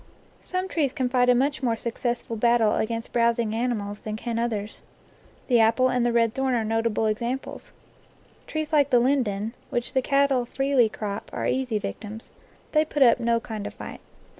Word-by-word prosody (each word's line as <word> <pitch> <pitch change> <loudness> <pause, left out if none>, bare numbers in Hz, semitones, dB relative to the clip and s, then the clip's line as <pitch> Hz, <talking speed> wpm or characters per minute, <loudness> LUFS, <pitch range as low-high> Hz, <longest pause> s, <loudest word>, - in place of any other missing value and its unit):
Some 370 +1 -3
trees 295 -8 0
can 260 -4 -1
fight 250 -1 +3
a 250 - +6
much 280 +4 0
more 235 -3 +1
successful 235 0 -3
battle 230 -1 +3
against 230 +1 -3
browsing 235 -2 +2
animals 220 -3 -2
than 215 -1 -5
can 230 +1 -3
others. 220 -3 -3 0.7
The 245 -3 +4
apple 225 +3 +4
and 250 -1 +1
the 240 - +2
red 230 -1 +2
thorn 265 -1 0
are 230 - +1
notable 225 0 0
examples. 235 +5 -3 0.8
Trees 310 0 -4
like 285 -2 +4
the 250 - +5
linden, 235 -5 0 0.2
which 240 -3 -3
the 260 - +3
cattle 275 -2 +2
freely 270 -3 +2
crop, 210 -1 -5
are - - -3
easy 255 -4 0
victims; 215 +1 -7 0.4
they 305 -1 +4
put 300 -2 +2
up 240 -1 +5
no 235 -1 +2
kind 220 -3 -6
of - - -9
fight. - - -9
235 Hz, 180 wpm, -25 LUFS, 225-260 Hz, 0.8 s, a